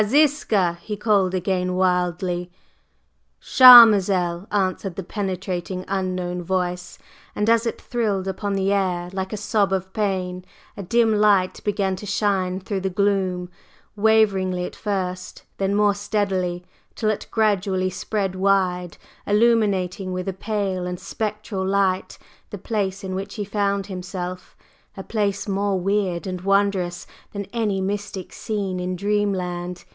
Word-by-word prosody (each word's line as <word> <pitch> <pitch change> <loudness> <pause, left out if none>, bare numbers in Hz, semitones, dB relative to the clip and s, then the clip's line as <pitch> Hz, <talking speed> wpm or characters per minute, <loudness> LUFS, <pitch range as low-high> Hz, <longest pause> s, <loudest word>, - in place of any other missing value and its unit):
Ziska!" 215 - +2
he 210 -1 -5
called 200 -4 +2
again 185 0 -1
wildly. 180 -1 0 0.9
"Charmazel!" 200 -8 +7
answered 190 -2 -1
the 195 - -5
penetrating 185 -1 -4
unknown 185 -2 -2
voice; 180 0 -3 0.4
and 210 - 0
as 230 +1 +3
it - - -3
thrilled 210 -6 -2
upon 200 +1 -3
the 195 +1 +1
air 180 -3 -1
like 190 0 -3
a 215 - -3
sob 205 -1 +1
of 190 0 -2
pain, 185 -3 -2 0.3
a - - -6
dim 225 +4 +2
light 205 -3 +2
began 200 -2 0
to 210 - -8
shine 190 -2 0
through 195 +1 -3
the 190 0 -2
gloom, 190 -2 0 0.5
waveringly 200 -4 +2
at - - -8
first, 185 -3 -4 0.2
then 195 +1 0
more 205 0 +3
steadily, 195 -4 -2 0.3
till 215 -2 +1
it 210 - -5
gradually 195 -4 +1
spread 195 0 -2
wide, 185 -2 0 0.3
illuminating 205 -4 +2
with 185 0 -4
a 195 - -1
pale 195 -2 -2
and 180 0 -5
spectral 210 -2 -4
light 190 -1 0 0.3
the 205 - -6
place 200 -1 -3
in 190 -1 -4
which 190 +1 -5
he 210 -3 -3
found 200 -1 -1
himself, 185 -1 -6 0.4
a 195 - -6
place 205 -2 -1
more 200 -1 0
weird 190 -2 -1
and 185 -2 -4
wondrous 195 -2 +1 0.3
than 200 -1 -4
any 215 -5 0
mystic 195 -1 -4
scene 200 -4 -3
in 180 0 -3
dream 205 +2 0
land. 180 -1 -4
195 Hz, 140 wpm, -22 LUFS, 185-205 Hz, 0.9 s, Charmazel